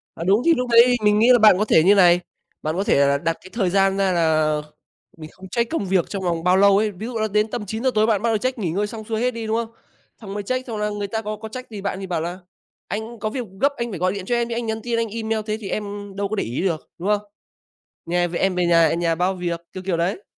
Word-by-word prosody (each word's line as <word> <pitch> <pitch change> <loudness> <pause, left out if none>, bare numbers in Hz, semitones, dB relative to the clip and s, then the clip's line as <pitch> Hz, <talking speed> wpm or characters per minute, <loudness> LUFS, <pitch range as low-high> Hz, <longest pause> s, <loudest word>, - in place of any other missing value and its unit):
À, 165 - -5
đúng 200 +6 +3
thì 335 - +5
lúc 250 -1 -2
đấy 240 +1 +6
mình 210 0 +4
nghĩ 240 +3 +6
là 245 - +6
bạn 215 -4 +6
có 210 - +2
thể 160 - +4
như 190 - +4
thế - - +7
này, 175 -2 +5 0.4
bạn 155 +2 -2
có 195 - 0
thể - - +2
là 140 0 +2
đặt 165 +2 0
cái 185 - -14
thời 195 -6 0
gian 195 0 +2
ra 190 -1 +2
là 155 -3 +2 0.6
mình 155 -1 -9
không 190 0 -13
check 235 +4 -1
công 320 -11 -1
việc 185 -2 +1
trong 195 -2 -4
vòng 170 -2 -1
bao 180 +1 +4
lâu 200 0 +5
ấy. 215 0 +1
Ví 205 +4 -8
dụ 240 -2 -4
là 215 0 0
đến 210 +2 +1
tầm 215 -3 -4
9:00 225 +6 -1
tối 215 +1 +3
bạn 210 -3 +1
bắt 230 - +1
đầu 220 - +1
check 255 +2 -2
nghỉ 180 -7 -2
ngơi 200 +5 -1
xong 220 +1 -8
xuôi 220 0 -3
hết 250 +1 +2
đi, 230 -2 -6
đúng 220 +1 0
không? 230 -1 -2 0.5
Xong 200 -2 -8
mới 205 - -3
check, 255 +5 -3
xong 225 -3 -5
là 210 0 -1
người 205 -1 -3
ta 220 +2 -3
có 215 0 -4
có 220 - -8
trách 255 +2 -9
gì 205 -2 -7
bạn 195 -1 -3
thì 195 - -5
bảo 170 -3 -2
là 175 +3 -4 0.5
"Anh 220 +2 -5
có 215 +1 -3
việc 250 0 -4 0.2
gấp 280 +1 +3
anh 235 -1 -3
phải 185 - -5
gọi 185 +2 +1
điện 200 -2 -5
cho 240 - 0
em 235 0 0
chứ 230 - -3
anh 235 -1 -3
nhắn 220 0 -3
tin, 235 -1 -1
anh 230 0 0
email 220 0 -2
thế 215 0 -1
thì 195 - -6
em 205 -1 -5
đâu 200 0 -2
có 215 - -3
để - - 0
ý 120 +9 -3
được", 170 -5 -2
đúng 180 - -3
không? 210 -1 +2 0.9
"Nhà 175 +1 +1
về 170 - -4
em 190 -1 +1
về 180 -1 +1
nhà 165 -2 +4
nhà 170 -1 0
bao 180 +3 0
việc", 170 -2 -3
kiểu 185 - -7
kiểu 185 -3 -1
đấy. 180 - -1
205 Hz, 310 wpm, -22 LUFS, 180-225 Hz, 0.9 s, thế